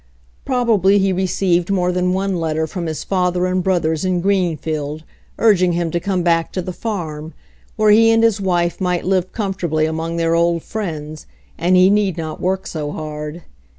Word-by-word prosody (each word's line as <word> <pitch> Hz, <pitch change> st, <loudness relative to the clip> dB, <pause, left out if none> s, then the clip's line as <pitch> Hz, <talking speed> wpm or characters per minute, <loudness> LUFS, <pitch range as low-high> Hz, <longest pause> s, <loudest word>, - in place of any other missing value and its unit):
Probably 225 Hz, -7 st, +3 dB
he 195 Hz, -1 st, +2 dB
received 180 Hz, -1 st, 0 dB
more 180 Hz, -2 st, +1 dB
than 180 Hz, 0 st, 0 dB
one 190 Hz, +1 st, -1 dB
letter 160 Hz, -1 st, -1 dB
from 170 Hz, +2 st, -5 dB
his 155 Hz, -1 st, -4 dB
father 180 Hz, -1 st, 0 dB
and 185 Hz, 0 st, 0 dB
brothers 165 Hz, -4 st, 0 dB
in 185 Hz, -1 st, 0 dB
Greenfield', 160 Hz, -5 st, -1 dB, 0.3 s
urging 185 Hz, -6 st, +3 dB
him 170 Hz, -1 st, -1 dB
to 170 Hz, -, 0 dB
come 185 Hz, -1 st, -1 dB
back 165 Hz, -1 st, +1 dB
to 185 Hz, -, -2 dB
the 185 Hz, -, -5 dB
farm, 165 Hz, -8 st, -5 dB, 0.4 s
where 215 Hz, -1 st, +4 dB
he 225 Hz, +2 st, +6 dB
and 225 Hz, 0 st, +4 dB
his 220 Hz, -3 st, +2 dB
wife 175 Hz, -2 st, 0 dB
might 180 Hz, -2 st, 0 dB
live 185 Hz, -1 st, 0 dB
comfortably 185 Hz, -7 st, -1 dB
among 160 Hz, +1 st, -3 dB
their 165 Hz, 0 st, +1 dB
old 170 Hz, 0 st, +1 dB
friends, 155 Hz, -7 st, -6 dB, 0.3 s
and 175 Hz, +3 st, +2 dB
he 185 Hz, +1 st, +6 dB
need 200 Hz, -4 st, +1 dB
not 160 Hz, -2 st, -5 dB
work 190 Hz, +1 st, -1 dB
so 150 Hz, -2 st, -4 dB
hard. 150 Hz, +2 st, -6 dB
180 Hz, 180 wpm, -19 LUFS, 165-190 Hz, 0.4 s, he